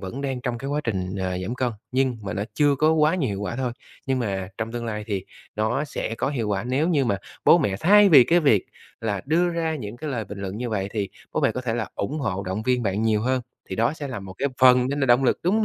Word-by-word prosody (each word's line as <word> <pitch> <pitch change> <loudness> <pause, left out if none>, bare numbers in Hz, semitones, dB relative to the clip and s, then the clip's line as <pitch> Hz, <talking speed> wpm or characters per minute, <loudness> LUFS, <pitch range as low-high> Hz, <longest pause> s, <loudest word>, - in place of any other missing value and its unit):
vẫn 100 +8 -6
đang 135 -2 -3
trong 125 -2 -3
cái 135 - -5
quá 150 +1 0
trình, 95 -4 -2
à, 95 -1 -2
giảm 95 +7 -3
cân, 125 -1 0 0.2
nhưng 130 -2 +1
mà 100 - -4
nó 100 0 -2
chưa 145 -2 +3
có 155 +3 +4
quá 155 +1 +3
nhiều 160 -9 0
hiệu 100 -1 -3
quả 105 +3 -3
thôi. 125 -2 -2 0.3
Nhưng 130 -1 +1
mà 95 -5 -2
trong 115 +1 -3
tương 120 -1 -4
lai 105 -2 -4
thì 100 -3 -3 0.3
nó 120 +7 0
sẽ 115 - -4
có 115 - -1
hiệu 115 -7 -2
quả 100 +1 -1
nếu 135 +7 +1
như 145 -6 +2
mà 100 -4 +1 0.3
bố 175 - +7
mẹ 100 - 0
thay 205 +3 +7
vì 140 -8 +8
cái 170 +6 +3
việc 125 - +3 0.3
là 105 -4 -2
đưa 170 +4 +2
ra 165 -2 -1
những 110 -4 -7
cái 150 +2 -5
lời 115 -5 -2
bình 100 +1 -9
luận 100 0 -5
như 120 0 -3
vậy, 100 -2 -1
thì 105 -3 -2 0.2
bố - - 0
mẹ - - +2
có 125 - -3
thể 120 -3 -2
là 110 -3 -2
ủng 145 +10 -3
hộ 100 -6 -2
động 95 +3 -3
viên 125 0 +1
bạn 100 +1 -1
nhiều 110 -2 +2
hơn. 130 0 0 0.3
Thì 95 - -3
đó 115 +5 +2
sẽ 145 -3 -6
là 125 -6 -5
một 95 -1 -9
cái 140 - +1
phần 125 -1 +6
nên 140 +1 -2
là 135 - +2
động 120 +2 +4
lực, - - +2
đúng 180 +5 +2
hông 220 - +2
120 Hz, 290 wpm, -24 LUFS, 105-140 Hz, 0.3 s, vì